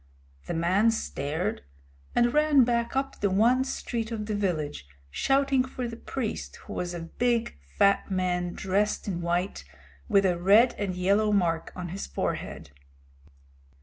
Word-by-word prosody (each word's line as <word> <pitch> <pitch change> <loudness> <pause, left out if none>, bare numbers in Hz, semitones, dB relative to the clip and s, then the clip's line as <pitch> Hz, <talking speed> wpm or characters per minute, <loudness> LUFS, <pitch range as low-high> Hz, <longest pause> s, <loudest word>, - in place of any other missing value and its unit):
The - - -2
man 185 +7 +3
stared, 180 -3 -2 0.5
and 240 0 +3
ran 300 -3 +5
back 235 0 0
up 270 0 -2
the 200 - +2
one 235 +7 +3
street 235 -3 -4
of 215 -2 -3
the 215 - -3
village 155 - -2 0.2
shouting 270 - +2
for 255 -1 -5
the 230 - -6
priest, 230 -1 -4
who - - -7
was 175 0 -3
a 170 - -5
big, 230 - -1 0.2
fat 200 0 +3
man 180 -2 -1
dressed 200 +3 0
in 175 -3 -2
white, 175 +3 -1 0.5
with 200 -2 +4
a 175 -2 +1
red 210 +7 +6
and 195 -3 -2
yellow 200 +4 +2
mark 170 -5 +1
on 180 -1 -5
his 190 +4 -5
forehead. 70 - -4
200 Hz, 150 wpm, -27 LUFS, 180-235 Hz, 0.5 s, red